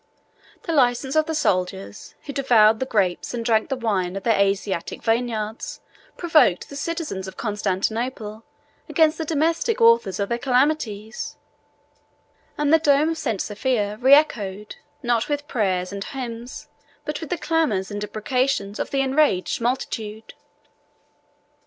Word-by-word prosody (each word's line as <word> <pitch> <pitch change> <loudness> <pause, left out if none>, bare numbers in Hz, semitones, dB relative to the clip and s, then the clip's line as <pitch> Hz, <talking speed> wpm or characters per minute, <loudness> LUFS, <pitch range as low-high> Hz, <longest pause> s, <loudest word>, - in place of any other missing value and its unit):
The 335 - -2
license 265 -1 +2
of 310 +1 +3
the 320 - -2
soldiers, 180 - -2
who 285 - -6
devoured 225 -6 +4
the 260 - -2
grapes 195 -2 0
and 230 -1 -4
drank 220 +1 +2
the 270 - 0
wine 195 -7 -1
of 195 - -5
their 230 - +3
Asiatic 195 -3 -1
vineyards, 225 -2 -2 0.4
provoked 315 - +3
the 280 - -9
citizens 295 - -4
of 190 - -9
Constantinople 215 +2 -2 0.5
against 320 -1 +3
the 320 - -2
domestic 330 +8 0
authors 230 -5 +4
of 200 - 0
their 235 0 -1
calamities, 250 -5 -1 1.2
and 295 +1 +2
the 325 - +7
dome 295 0 +3
of 325 - -2
St. 225 -10 -2
Sophia 210 0 -1
reechoed, 215 -8 +3 0.3
not 240 0 +1
with 290 0 -2
prayers 185 -6 -1
and 200 0 -4
hymns, 240 -1 -7 0.4
but 300 +1 -4
with 320 - -6
the 355 - -1
clamors 280 - 0
and 205 0 -4
imprecations 215 0 -1
of - - -3
an 270 - +3
enraged 270 -5 +1
multitude. 225 -3 -3
235 Hz, 140 wpm, -23 LUFS, 205-285 Hz, 1.2 s, the